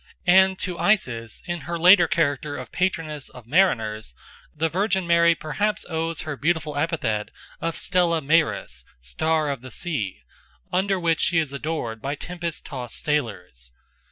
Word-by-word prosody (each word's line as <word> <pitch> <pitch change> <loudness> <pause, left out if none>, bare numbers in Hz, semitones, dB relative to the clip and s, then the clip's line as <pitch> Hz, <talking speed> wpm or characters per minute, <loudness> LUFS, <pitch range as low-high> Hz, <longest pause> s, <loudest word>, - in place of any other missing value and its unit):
And 190 +1 +5
to 180 -1 -4
Isis 115 - 0
in 175 0 -3
her 170 +5 -4
later 175 +1 +7
character 150 -6 0
of - - -8
patroness 160 -6 -2
of 125 -3 -13
mariners 110 - +1 0.4
the 160 +2 0
Virgin 190 +2 0
Mary 170 0 +5
perhaps 210 +7 -2
owes 165 -1 -2
her 155 -2 -4
beautiful 155 0 -1
epithet 145 - -1 0.3
of 165 0 -2
Stella 175 -3 +2
Maris, 155 - +1 0.2
"Star 150 - 0
of 135 -4 -5
the 130 - -9
Sea," 110 - -4 0.5
under 190 +1 +1
which 165 -2 +1
she 175 - +2
is 155 -4 +1
adored 140 -7 -3
by 140 +2 -2
tempest 170 +1 -5
tossed 125 +2 -6
sailors. 95 - -2
160 Hz, 150 wpm, -24 LUFS, 130-175 Hz, 0.5 s, later